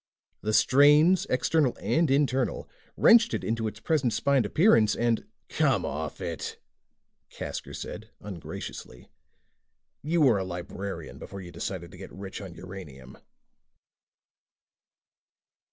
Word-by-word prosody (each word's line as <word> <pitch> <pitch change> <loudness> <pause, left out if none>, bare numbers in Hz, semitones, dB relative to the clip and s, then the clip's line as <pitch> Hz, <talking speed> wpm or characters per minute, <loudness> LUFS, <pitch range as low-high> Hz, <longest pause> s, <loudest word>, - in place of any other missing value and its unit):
The 110 - -1
strains, 150 +9 +5
external 135 +1 +1
and 165 -1 +1
internal, 135 -2 +1 0.3
wrenched 230 0 +6
it - - -4
into 115 0 -1
its 105 0 -7
present 135 -3 +1
spined 135 -1 +2
appearance 115 - +4
and 120 -1 0
" - - -48
"Come - - +3
off 75 +2 -4
it," 85 -5 -5 0.7
Casker - - -6
said - - -7
ungraciously. 85 -9 -8 0.9
"You 165 +3 0
were 125 -8 +5
a - - -1
librarian 95 +2 -6
before 100 - -8
you 90 -1 -10
decided 85 0 -5
to 95 - -13
get 95 - -10
rich 95 +1 -8
on 95 -4 -9
uranium." 75 -9 -10
110 Hz, 120 wpm, -27 LUFS, 95-140 Hz, 0.9 s, wrenched